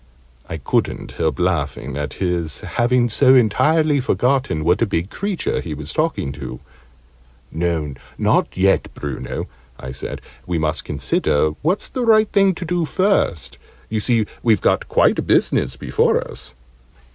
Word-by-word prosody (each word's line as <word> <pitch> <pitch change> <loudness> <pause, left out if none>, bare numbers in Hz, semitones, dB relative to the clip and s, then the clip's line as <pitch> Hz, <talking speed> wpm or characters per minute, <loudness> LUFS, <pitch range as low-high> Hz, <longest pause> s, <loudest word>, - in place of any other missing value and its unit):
I 80 - -4
couldn't 70 - -1
help 80 -4 -1
laughing 75 -6 -1
at 75 0 -4
his 85 -5 -2
having 120 0 +1
so 130 +3 +4
entirely 150 +6 +3
forgotten 130 - 0
what 90 +5 +2
a 115 - +3
big 90 0 -2
creature 200 -3 -2
he 80 -3 -5
was 75 +1 -6
talking 155 - -1
to. 65 -3 -7 0.9
"No, 80 -3 -1 0.2
not - - +1
yet, 95 +1 +2
Bruno," 70 -3 -5 0.3
I 65 - -7
said: 65 - -5 0.3
"we 90 -2 -1
must 80 0 -1
consider 75 +2 +1
what's 180 +7 0
the 255 - -3
right 220 -2 +5
thing 195 -3 +3
to 175 - -5
do 175 0 0
first. 185 - 0 0.3
You 110 - -1
see 110 +1 +2 0.2
we've 110 -4 +3
got - - +1
quite - - +3
a - - +2
business - - +1
before - - +1
us." 65 0 -11
95 Hz, 150 wpm, -20 LUFS, -, 0.9 s, right